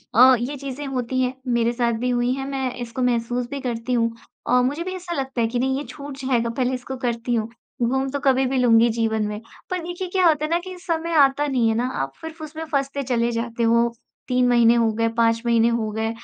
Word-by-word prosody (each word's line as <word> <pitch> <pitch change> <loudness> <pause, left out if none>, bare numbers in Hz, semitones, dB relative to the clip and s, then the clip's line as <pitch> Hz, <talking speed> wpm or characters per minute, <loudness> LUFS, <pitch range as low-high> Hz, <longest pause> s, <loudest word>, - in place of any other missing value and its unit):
अ, 255 +2 +8
ये 265 +4 -3
चीज़ें 275 +1 -6
होती 255 -1 -1
हैं, 250 0 0
मेरे 235 -1 +2
साथ 235 -1 +1
भी 250 - -1
हुई 245 0 +1
हैं। 270 0 -4
मैं 265 -2 -2
इसको 240 +1 -5
महसूस 245 0 0
भी 280 -1 -5
करती 240 -1 -3
हूँ 230 -1 +2 0.4
औ 250 0 +4
मुझे 290 +6 -1
भी 370 +1 -4
ऐसा 350 -1 -5
लगता 265 -4 -2
है 225 - +2
कि 240 +1 -2
नहीं, 265 +1 +1
ये 285 - -3
छूट 285 -2 -8
जाएगा, 255 -4 0
पहले 250 +2 -1
इसको 255 +1 -5
करती 240 -1 -2
हूँ। 220 -1 -1 0.3
घूम 265 +3 +1
तो 285 - -2
कभी 265 -1 +3
भी 265 +1 0
लूँगी 235 -2 +5
जीवन 220 -1 0
में। 210 0 -4 0.3
पर 365 -1 -1
देखिए, 350 +2 -5
क्या 365 -1 +3
होता 305 -1 +2
है - - -4
ना 340 - +4
कि 370 0 -9
समय 335 -1 -2
आता 275 +1 +4
नहीं 255 -5 +2
है 220 - +1
ना, 240 - 0
आप 135 - -3
फिर 320 - -6
उसमें 315 0 -7
फँसते 275 -1 -1
चले 240 -2 0
जाते 230 0 -2
हो। 235 +1 +3 0.3
3 250 -1 +2
महीने 235 -1 +5
हो 230 -1 +3
गए, 230 +1 +1
5 230 0 +2
महीने 230 -1 +4
हो 230 -2 -1
गए 220 +1 -2
250 Hz, 240 wpm, -23 LUFS, 235-275 Hz, 0.4 s, अ